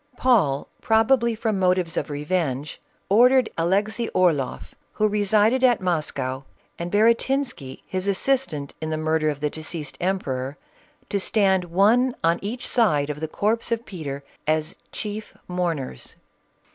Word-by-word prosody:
Paul, 190 - +2
probably 230 +1 +3
from 215 -3 -1
motives 180 -2 +1
of - - -2
revenge, 150 -1 -2 0.3
ordered 250 +4 +5
Alexey 205 +7 0
Orloff, 160 -8 +1 0.2
who 215 - +2
resided 210 +4 +2
at 245 -3 +5
Moscow, 145 -7 -2 0.4
and 170 +1 -3
Baratinsky, 230 - +1
his 185 +1 -3
assistant 200 - 0
in 155 - -3
the 155 - -1
murder 155 0 +1
of 145 -1 -4
the 150 - +1
deceased 155 -1 -5
emperor, 140 -7 -2 0.5
to 200 - 0
stand 190 -2 +2
one 220 +9 +3
on 165 +1 +3
each 230 +5 -4
side 150 - +2
of 150 - -7
the 160 - -3
corpse 220 +8 -1
of 230 +1 -1
Peter 145 -7 -6 0.2
as 155 +1 0 0.2
chief 210 0 -6
mourners. 170 - -3
185 Hz, 135 wpm, -24 LUFS, 155-220 Hz, 0.5 s, ordered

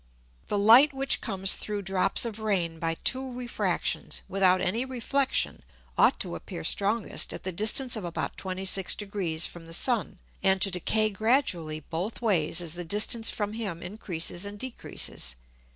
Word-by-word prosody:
The 205 - -1
Light 235 +8 +7
which 270 0 +1
comes 195 -4 +1
through 205 -1 -3
drops 190 +4 +1
of 225 -2 -5
Rain 180 -7 -1
by 165 0 -1
two 260 0 +2
Refractions 245 -1 -2
without 185 -1 +3
any 220 +8 0
Reflexion, 265 +1 0 0.3
ought - - +4
to - - -2
appear - - -7
strongest 205 +2 +1
at - - -9
the 185 - -2
distance 220 +7 +3
of 215 - -5
about 170 -1 -4
26 190 0 0
Degrees 190 -6 -2
from 165 -1 -3
the 165 - -3
Sun, 230 -5 +1 0.2
and 190 0 +3
to 195 - +2
decay 215 +4 +1
gradually 195 - 0
both 175 +9 -4
ways 175 -8 +2
as 165 -2 -1
the 175 0 -5
distance 210 +5 +2
from 210 -1 -3
him 200 -7 -4
increases 175 -2 -3
and 205 0 -6
decreases. 205 - -4
200 Hz, 160 wpm, -27 LUFS, 175-225 Hz, 0.3 s, Light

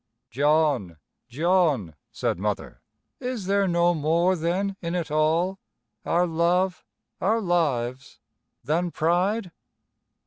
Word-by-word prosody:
"John, 140 - +1 0.3
John," 150 - +1 0.2
said - - -2
Mother, - - -3 0.4
"is 250 -6 -4
there 200 0 +2
no 175 0 +3
more 170 +4 +2
then 185 +4 -1
in 170 0 -3
it 165 -4 -3
all 165 +5 +1 0.5
our 175 +1 +3
love, 175 +2 +1 0.4
our 220 +5 +2
lives 140 - -1 0.5
than 165 +7 0
pride?" 180 +5 0
170 Hz, 105 wpm, -25 LUFS, 155-185 Hz, 0.5 s, no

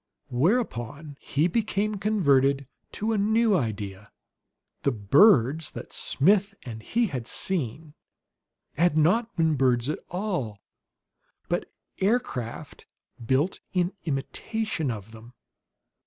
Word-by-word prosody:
Whereupon 145 - -1
he 150 +4 +1
became 210 +1 -1
converted 140 - +2 0.3
to 220 +2 -1
a 215 - +1
new 220 +1 +3
idea: 105 - -3 0.7
The 140 - +2
birds 135 - +4
that - - -8
Smith 200 +7 +2
and 110 -3 -7
he 230 - +1
had 130 - -4
seen 155 - -2 0.8
had 170 -1 +3
not 220 +10 +2
been 160 -1 +2
birds 130 -2 +2
at - - -2
all, 175 - -3 0.9
but - - -2 0.3
aircraft 190 - -2 0.4
built 135 +9 +1
in 180 0 +1
imitation 160 - -2
of 110 -2 -6
them. 115 +2 -14
155 Hz, 110 wpm, -26 LUFS, 125-200 Hz, 0.9 s, birds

